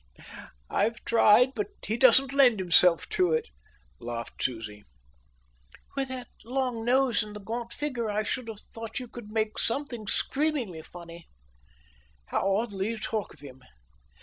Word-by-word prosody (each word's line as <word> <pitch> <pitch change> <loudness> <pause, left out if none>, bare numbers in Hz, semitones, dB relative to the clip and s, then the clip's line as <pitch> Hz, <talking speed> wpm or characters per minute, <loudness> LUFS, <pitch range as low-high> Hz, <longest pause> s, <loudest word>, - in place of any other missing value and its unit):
"I've 225 - 0
tried, 235 +3 +5
but 415 - -2 0.2
he 220 - -1
doesn't 260 +2 +5
lend 255 -6 +5
himself 180 -1 +4
to 395 -3 +2
it," 470 0 0 0.5
laughed 115 -1 -6
Susie. 110 -4 -3 1.1
"With 275 -1 0
that 255 -1 -5 0.2
long 250 -1 -2
nose 250 -1 +3
and 210 -1 -6
the - - -6
gaunt 230 +3 -5
figure 245 -7 -3
I 210 +1 0
should 245 +2 -3
have 215 -2 -6
thought 225 +2 -5
you 250 - -7
could 235 -2 -10
make 215 0 -1
something 240 -3 -1
screamingly 270 - 0
funny." 170 0 -12 1.0
"How 195 - +1
oddly 205 -3 -1
you 230 - -3
talk 215 -1 -3
of 150 - -23
him! 130 -2 -12
225 Hz, 150 wpm, -28 LUFS, 195-255 Hz, 1.1 s, tried